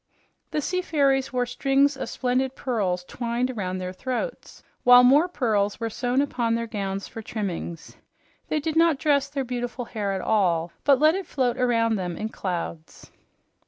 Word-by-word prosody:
The 300 Hz, -, -1 dB
sea 365 Hz, +5 st, -1 dB
fairies 275 Hz, -6 st, +1 dB
wore 250 Hz, -1 st, 0 dB
strings 275 Hz, +3 st, +2 dB
of 270 Hz, -, -5 dB
splendid 255 Hz, +1 st, -1 dB
pearls 195 Hz, -8 st, -1 dB
twined 240 Hz, +5 st, -2 dB
around 185 Hz, -6 st, -3 dB
their 185 Hz, 0 st, -5 dB
throats, 260 Hz, -, -5 dB, 0.2 s
while 245 Hz, 0 st, +8 dB
more 285 Hz, +7 st, +6 dB
pearls 215 Hz, -, 0 dB
were 230 Hz, -1 st, -3 dB
sewn 245 Hz, +4 st, +1 dB
upon 235 Hz, -5 st, 0 dB
their 230 Hz, 0 st, -2 dB
gowns 195 Hz, -3 st, -4 dB
for 225 Hz, -, -8 dB
trimmings. 185 Hz, -7 st, -5 dB, 0.5 s
They 305 Hz, -, 0 dB
did 315 Hz, +1 st, -3 dB
not 330 Hz, -2 st, +4 dB
dress 280 Hz, -1 st, +2 dB
their 275 Hz, -2 st, -3 dB
beautiful 245 Hz, 0 st, -4 dB
hair 210 Hz, -4 st, -3 dB
at 190 Hz, -, -2 dB
all, 175 Hz, -6 st, +1 dB
but 275 Hz, -3 st, +5 dB
let 310 Hz, +2 st, +5 dB
it 380 Hz, -2 st, -4 dB
float 255 Hz, -5 st, 0 dB
around 230 Hz, -3 st, +2 dB
them 180 Hz, -3 st, -4 dB
in 220 Hz, -, -3 dB
clouds. 170 Hz, -5 st, -6 dB
245 Hz, 170 wpm, -25 LUFS, 205-275 Hz, 0.5 s, while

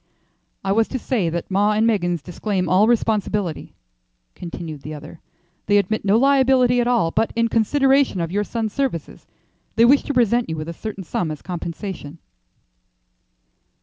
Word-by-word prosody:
"I 195 Hz, -, -1 dB
was 225 Hz, +2 st, +2 dB
to 260 Hz, -, -3 dB
say 225 Hz, -8 st, -1 dB
that 170 Hz, +3 st, -4 dB
'Maw 205 Hz, +2 st, +3 dB
and 215 Hz, +1 st, +2 dB
Meggins' 175 Hz, -8 st, 0 dB
disclaim 185 Hz, +1 st, -2 dB
all 190 Hz, +5 st, +4 dB
responsibility," 210 Hz, -6 st, -1 dB, 0.6 s
continued 165 Hz, -4 st, -7 dB
the 155 Hz, +3 st, -7 dB
other. 150 Hz, +2 st, -11 dB, 0.5 s
"They 205 Hz, 0 st, +4 dB
admit 215 Hz, +2 st, 0 dB
no 200 Hz, +2 st, +3 dB
liability 260 Hz, -2 st, +4 dB
at 240 Hz, -, 0 dB
all, 235 Hz, -10 st, +2 dB
but 225 Hz, -, 0 dB
in 230 Hz, 0 st, +1 dB
consideration 270 Hz, +1 st, +2 dB
of 165 Hz, -1 st, -2 dB
your 205 Hz, +2 st, 0 dB
son's 220 Hz, -1 st, -3 dB
services, 260 Hz, -, -3 dB, 0.5 s
they 230 Hz, -, +5 dB
wish 275 Hz, +4 st, +5 dB
to 285 Hz, -, -2 dB
present 240 Hz, -2 st, +2 dB
you 160 Hz, -, -3 dB
with 155 Hz, +1 st, -5 dB
a -, -, -5 dB
certain 200 Hz, +1 st, -7 dB
sum 170 Hz, 0 st, -2 dB
as 155 Hz, -1 st, -7 dB
compensation." 170 Hz, -2 st, -6 dB
205 Hz, 165 wpm, -21 LUFS, 170-235 Hz, 0.6 s, they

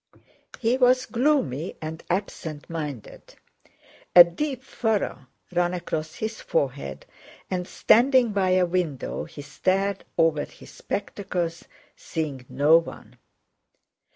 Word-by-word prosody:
He 240 Hz, +2 st, +2 dB
was 255 Hz, 0 st, +4 dB
gloomy 235 Hz, -, 0 dB
and 160 Hz, +1 st, -6 dB
absent 170 Hz, -5 st, -3 dB
minded. 150 Hz, -8 st, -7 dB, 0.8 s
A 175 Hz, -, +13 dB
deep 265 Hz, -, -4 dB
furrow 215 Hz, -, -2 dB, 0.2 s
ran 175 Hz, 0 st, +1 dB
across 160 Hz, -2 st, -4 dB
his 220 Hz, +1 st, -4 dB
forehead, 130 Hz, -, -2 dB, 0.5 s
and 180 Hz, -1 st, -2 dB
standing 250 Hz, 0 st, +4 dB
by 195 Hz, -2 st, +1 dB
a 185 Hz, -1 st, +4 dB
window 170 Hz, -6 st, -2 dB
he 145 Hz, -, -10 dB
stared 195 Hz, +6 st, 0 dB
over 160 Hz, -2 st, +3 dB
his -, -, -15 dB
spectacles 180 Hz, -4 st, -4 dB, 0.3 s
seeing 140 Hz, -6 st, -5 dB
no 150 Hz, +3 st, +5 dB
one. 165 Hz, -, -11 dB
175 Hz, 110 wpm, -25 LUFS, 155-215 Hz, 0.8 s, A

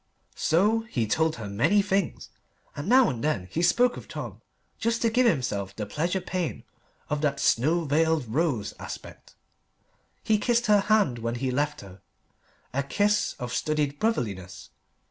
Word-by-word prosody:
So 205 Hz, +8 st, +2 dB
he 120 Hz, -, 0 dB
told 160 Hz, +8 st, +1 dB
her 110 Hz, -3 st, -7 dB
many 145 Hz, -, +2 dB
things. 195 Hz, -2 st, -1 dB, 0.5 s
And 145 Hz, +7 st, -4 dB
now 255 Hz, 0 st, +6 dB
and 120 Hz, 0 st, -3 dB
then 125 Hz, -12 st, -1 dB
he 165 Hz, -, -1 dB
spoke 245 Hz, +8 st, +3 dB
of -, -, -10 dB
Tom, -, -, -7 dB, 0.4 s
just 230 Hz, 0 st, 0 dB
to 230 Hz, -, +3 dB
give 250 Hz, +1 st, +4 dB
himself 105 Hz, -, -1 dB
the 105 Hz, -, -4 dB
pleasure 170 Hz, -, -1 dB
pain 180 Hz, -2 st, -3 dB, 0.4 s
of 150 Hz, 0 st, -2 dB
that 140 Hz, -2 st, 0 dB
snow 155 Hz, +6 st, +2 dB
veiled 155 Hz, -1 st, +1 dB
rose 120 Hz, -4 st, -1 dB
aspect. -, -, -9 dB, 0.9 s
He 215 Hz, -1 st, +2 dB
kissed 240 Hz, +2 st, +1 dB
her 210 Hz, -1 st, +5 dB
hand 200 Hz, -, +2 dB
when 115 Hz, +1 st, -2 dB
he 130 Hz, +1 st, -2 dB
left 145 Hz, +3 st, -1 dB
her 95 Hz, -1 st, -13 dB, 0.7 s
a 140 Hz, -, +1 dB
kiss 205 Hz, +9 st, +1 dB
of 125 Hz, -1 st, -5 dB
studied 150 Hz, -2 st, -1 dB
brotherliness. 100 Hz, -, -2 dB
155 Hz, 160 wpm, -26 LUFS, 120-205 Hz, 0.9 s, now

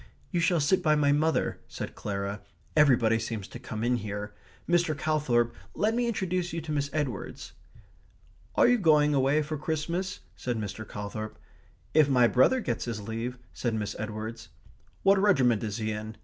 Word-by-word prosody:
"You 175 Hz, -, +1 dB
shall 170 Hz, 0 st, +3 dB
sit 155 Hz, +6 st, +3 dB
by 155 Hz, -1 st, +3 dB
my 145 Hz, -1 st, +3 dB
mother," 155 Hz, +3 st, +1 dB
said -, -, -6 dB
Clara. 100 Hz, 0 st, -4 dB, 0.3 s
"Everybody 120 Hz, -7 st, +5 dB
seems 110 Hz, -3 st, -4 dB
to 120 Hz, -, -8 dB
come 110 Hz, -3 st, -5 dB
in 125 Hz, +1 st, +2 dB
here.... 105 Hz, -1 st, -5 dB, 0.3 s
Mr. 170 Hz, -3 st, +2 dB
Calthorp, 130 Hz, -6 st, +1 dB, 0.2 s
let 215 Hz, +2 st, +1 dB
me 240 Hz, +1 st, +1 dB
introduce 185 Hz, -5 st, -1 dB
you 165 Hz, -, -2 dB
to 155 Hz, -, -6 dB
Miss 145 Hz, -1 st, 0 dB
Edwards." 140 Hz, -9 st, -4 dB, 1.0 s
"Are -, -, +6 dB
you 245 Hz, -1 st, +4 dB
going 150 Hz, -5 st, +4 dB
away 140 Hz, +2 st, +3 dB
for 150 Hz, 0 st, -4 dB
Christmas?" 170 Hz, +5 st, -2 dB
said 125 Hz, -2 st, -3 dB
Mr. 105 Hz, 0 st, -5 dB
Calthorp. 105 Hz, +1 st, -6 dB, 0.6 s
"If 155 Hz, -2 st, +5 dB
my 125 Hz, -3 st, +5 dB
brother 130 Hz, -, +4 dB
gets 120 Hz, -, -2 dB
his 115 Hz, -3 st, -3 dB
leave," 115 Hz, +3 st, -3 dB, 0.2 s
said 120 Hz, -3 st, -1 dB
Miss 105 Hz, -2 st, -3 dB
Edwards. 110 Hz, +1 st, -5 dB, 0.5 s
"What 195 Hz, 0 st, +5 dB
regiment 130 Hz, -, +3 dB
is 105 Hz, -1 st, -3 dB
he 110 Hz, -1 st, -2 dB
in?" 110 Hz, +1 st, -6 dB
130 Hz, 170 wpm, -28 LUFS, 110-160 Hz, 1.0 s, Are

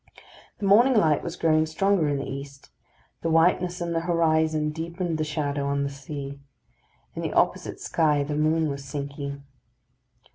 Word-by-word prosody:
The 205 Hz, -, -4 dB
morning 235 Hz, +7 st, +5 dB
light 160 Hz, -8 st, +3 dB
was 170 Hz, 0 st, -5 dB
growing 155 Hz, -2 st, +2 dB
stronger 180 Hz, +1 st, +1 dB
in 145 Hz, -1 st, 0 dB
the 135 Hz, -, -4 dB
east; 140 Hz, 0 st, -8 dB, 0.5 s
the 165 Hz, -, -1 dB
whiteness 175 Hz, +2 st, +2 dB
in 170 Hz, 0 st, -2 dB
the 165 Hz, -, +1 dB
horizon 160 Hz, -2 st, +1 dB
deepened 165 Hz, +1 st, -3 dB
the -, -, +1 dB
shadow 145 Hz, -2 st, -2 dB
on 140 Hz, 0 st, 0 dB
the 140 Hz, -, -1 dB
sea. 140 Hz, 0 st, -7 dB, 0.7 s
In -, -, -5 dB
the -, -, -3 dB
opposite -, -, 0 dB
sky 150 Hz, -3 st, +1 dB
the 145 Hz, +1 st, -4 dB
moon 155 Hz, +1 st, +2 dB
was 140 Hz, -1 st, -4 dB
sinking. 140 Hz, 0 st, -6 dB
155 Hz, 160 wpm, -25 LUFS, 140-165 Hz, 0.7 s, morning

